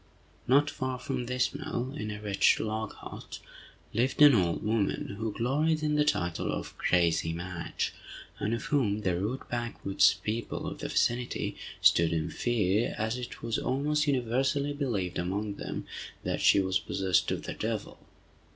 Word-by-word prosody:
Not 145 +3 +4
far 130 -2 -3
from 125 -1 -3
this 125 0 +1
mill, 130 +3 -3
in 105 -6 -4
a 105 0 -5
wretched 105 -2 +3
log 110 0 -3
hut, - - -9 0.6
lived 125 +4 +1
an 145 -1 +9
old 90 -6 +2
woman, 105 -2 0
who 110 -1 -1
gloried 150 +8 +1
in 150 0 +1
the 150 0 +4
title 85 - 0
of - - -5
"crazy 85 -2 +2
Madge," 85 0 -3 0.5
and 105 - -1
of 115 - -5
whom 125 -9 +1
the 90 -4 +1
rude 105 +9 -3
backwoods 115 -5 +2
people 115 +2 -3
of - - -5
the - - -3
vicinity 120 +1 0 0.3
stood 85 0 +5
in 80 0 -1
fear, 110 -3 +1
as 110 +2 -1
it 125 - -8
was 115 -1 -1
almost 150 +3 0
universally 135 +2 +1
believed 105 -12 -2
among 100 +3 -2
them - - -5 0.4
that - - -1
she - - +6
was 95 -1 +1
possessed 95 -1 +1
of - - -2
the - - -4
devil. - - -4
115 Hz, 160 wpm, -29 LUFS, 95-130 Hz, 0.6 s, an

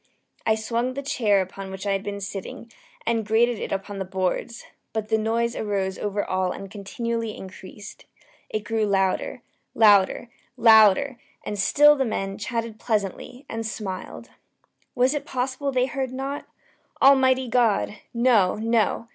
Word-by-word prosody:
I 220 - +4
swung 235 +3 -2
the 280 - -4
chair 210 -8 +2
upon 190 +1 -7
which 190 +1 -7
I 200 - 0
had 195 0 0
been 200 0 -5
sitting, 200 +4 -7 0.3
and 230 -1 +1
grated 225 +2 +2
it - - -5
upon 195 +1 -4
the - - -1
boards, 190 +5 -3 0.3
but 215 -1 -3
the 220 - +3
noise 230 +2 0
arose 195 -3 -2
over 205 0 -2
all 185 -1 0
and 195 -1 -8
continually 225 +2 -4
increased. 190 +2 -11 0.4
It 215 - -2
grew 220 0 0
louder 195 -2 0 0.3
louder 210 +2 +4 0.3
louder! 225 +3 +5 0.3
And 210 - -4
still 295 +8 +6
the 270 - +1
men 195 -5 -3
chatted 230 0 -4
pleasantly, 220 +4 -3
and 225 0 -4
smiled. 205 -4 -6 0.6
Was 255 +2 +3
it 295 - -2
possible 260 +2 -2
they 255 -1 +2
heard 260 0 -3
not? 270 +2 -5 0.5
Almighty 260 -1 +5
God! 225 -3 +1
no, 235 -6 +3
no! 225 +1 0
220 Hz, 150 wpm, -24 LUFS, 200-245 Hz, 0.6 s, still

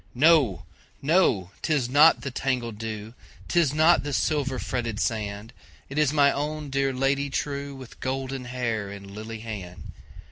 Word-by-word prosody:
No! 140 - +4 0.3
no! 135 - +2
'tis 145 -6 +1
not 145 +5 +6
the 135 - -4
tangled 120 -4 -2
dew,'Tis 115 +8 -2
not 160 +3 +5
the 145 0 -4
silver 140 -2 0
fretted 120 -4 -3
sand, 105 0 -3 0.4
It 140 +3 -2
is 150 -3 +3
my 145 -2 +4
own 150 0 -3
dear 135 0 +1
Lady 135 +2 0
trueWith 140 -2 -5
golden 130 0 -3
hair 115 -5 -2
and 100 0 -9
lily 110 +2 -7
hand! 100 -6 -7
130 Hz, 140 wpm, -26 LUFS, 110-140 Hz, 0.4 s, not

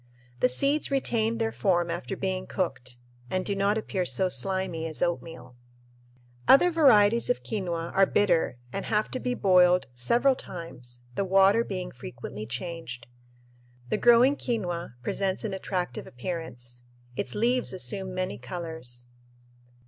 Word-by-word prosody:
The 125 - +3
seeds 280 - +1
retain 230 -5 0
their 225 -1 0
form 175 -4 +1
after 180 +3 -4
being 185 -1 -2
cooked 125 -9 -3 0.3
and 185 0 -1
"do 200 - -1
not 200 +2 +1
appear 195 -4 -2
so 185 +1 +2
slimy 175 +2 0
as 155 - -3
oatmeal." 165 -7 -4 0.9
Other 355 +6 +7
varieties 235 -9 +5
of 245 - 0
quinoa 175 -6 -3
are 195 0 +5
bitter 175 -10 +2 0.2
and 195 - -3
have 215 0 0
to 255 - -2
be 250 -1 -2
boiled 180 -3 +4
several 235 - +3
times, 125 - -8
the 200 - -1
water 195 +4 +4
being 185 -4 -5
frequently 120 -3 -8
changed. 125 -2 -6 0.8
The - - +1
growing 240 +5 +5
quinoa 175 - -3
presents 190 - -1
an 215 -3 -3
attractive 180 -7 -3
appearance; 125 -4 -6 0.3
its 125 - -3
leaves 245 +3 +1
assume 190 0 -2
many 185 +1 -3
colors. 160 -9 -5
185 Hz, 140 wpm, -27 LUFS, 165-210 Hz, 0.9 s, Other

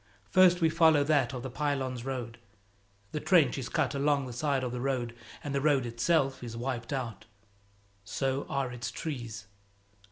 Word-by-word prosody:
First 180 -1 +6
we 165 - +5
follow 160 -3 +5
that 140 -5 +2
of 125 -2 -6
the 130 - -5
Pylones 130 -3 -2
road. 125 -3 -5 0.7
The 150 - -2
trench 150 -7 +4
is 125 - -5
cut 145 -4 0
along 140 0 +1
the 125 - -7
side 135 +1 0
of 125 - -2
the 125 0 -4
road, 125 -3 -1 0.3
and 145 - -4
the 140 - 0
road 140 -3 +3
itself 130 +3 +1
is 115 -1 -6
wiped 120 0 -3
out; 115 -6 -4 0.8
so 135 +6 -2
are 135 -2 -1
its 125 0 -4
trees. 120 -8 -5
135 Hz, 170 wpm, -30 LUFS, 120-145 Hz, 0.8 s, First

